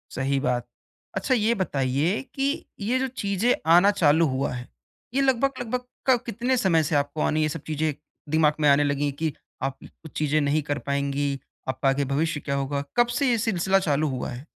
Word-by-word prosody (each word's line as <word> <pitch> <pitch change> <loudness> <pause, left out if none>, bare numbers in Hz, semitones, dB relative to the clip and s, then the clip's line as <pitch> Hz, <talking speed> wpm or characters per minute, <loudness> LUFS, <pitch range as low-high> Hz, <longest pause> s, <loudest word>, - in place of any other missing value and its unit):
सही 135 +1 0
बात। 125 -3 -1 0.5
अच्छा, 260 - 0
ये 225 -1 +3
बताइए 145 - 0
कि 275 +1 -1
ये 230 +5 0
जो 265 - 0
चीज़ें 220 -2 0 0.2
आना 180 +4 +7
चालू 165 -4 +4
हुआ 130 -1 -1
है, 125 0 -6 0.5
ये 275 - +2
लगभग-लगभग 260 -2 +1 0.3
क 255 - +6
कितने 245 +2 0
समय 170 -8 +3
से 150 +1 -1
आपको 145 +2 0
आनी 155 - +1
ये 155 - +2
सब 155 0 -5
चीज़ें, 155 0 0 0.4
दिमाग 155 0 +3
में 150 -1 +4
आने 140 +1 +5
लगी 145 0 0
है 145 - 0
कि 155 +2 -2 0.3
आप 135 0 -2
कुछ 160 - -14
चीज़ें 150 0 +2
नहीं 145 +2 +1
कर 145 0 -2
पाएँगी, 140 0 -1 0.3
आपका 130 +1 +1
आगे 140 +1 +1
भविष्य 145 +3 0
क्या 140 -1 -3
होगा? 140 +1 -1
कब 240 0 +5
से 255 +3 +1
ये 240 - +3
सिलसिला 195 -3 +2
चालू 155 -4 +1
हुआ 130 -2 -3
है? 125 +3 -8
155 Hz, 195 wpm, -25 LUFS, 140-210 Hz, 0.5 s, आना